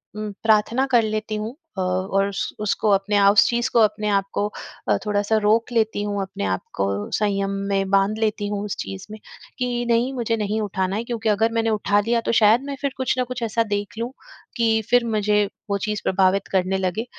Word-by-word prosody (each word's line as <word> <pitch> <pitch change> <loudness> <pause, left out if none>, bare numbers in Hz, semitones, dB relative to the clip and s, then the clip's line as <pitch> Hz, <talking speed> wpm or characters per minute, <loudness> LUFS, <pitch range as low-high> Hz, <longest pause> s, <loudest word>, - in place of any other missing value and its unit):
उम, 215 0 -4
प्रार्थना 225 +4 +3
कर 240 -2 +5
लेती 215 0 -2
हूँ 215 +4 -4 0.2
अ, - - 0
और 185 +2 0
उस 195 - -3
उसको 215 0 0
अपने 200 +1 +1
आप 200 0 +6
उस 205 - +6
चीज़ 240 0 0
को 235 - +5
अपने 210 -1 +2
आप 200 -1 +2
को 205 - 0 0.4
अ, - - +4
थोड़ा-सा 210 +1 +1
रोक 220 +3 +2
लेती 220 -3 +1
हूँ 205 -1 -2
अपने 190 - -5
आप 95 -1 -1
को, 100 +1 -2
संयम 200 -2 0 0.2
में 195 -1 0
बांध 195 +2 +2
लेती 215 -2 0
हूँ 205 0 -3
उस 205 - -3
चीज़ 95 0 -6
में। 215 - -8 0.4
कि 245 -1 -1
नहीं 235 +3 +2
मुझे 235 -3 -1
नहीं 210 0 -1
उठाना 190 -2 -2
है 220 - -2
क्योंकि 230 -2 -2
अगर 220 +2 +2
मैंने 225 0 0
उठा 205 -1 +2
लिया 230 +3 +1
तो - - -1
शायद 220 +3 +5
मैं 280 0 -4
फिर 280 - 0
कुछ 260 0 0
ना 255 - +2
कुछ 250 0 -6
ऐसा 230 +1 +1
देख 205 +1 -3
लूँ 235 +2 -3 0.5
कि 225 -1 +2
फिर 245 0 +4
मुझे 210 -2 +2 0.2
वो 200 - +1
चीज़ 210 +1 -3
प्रभावित 190 +1 +2
करने 190 0 +1
लगे। 190 +4 -2
210 Hz, 215 wpm, -22 LUFS, 200-230 Hz, 0.5 s, आप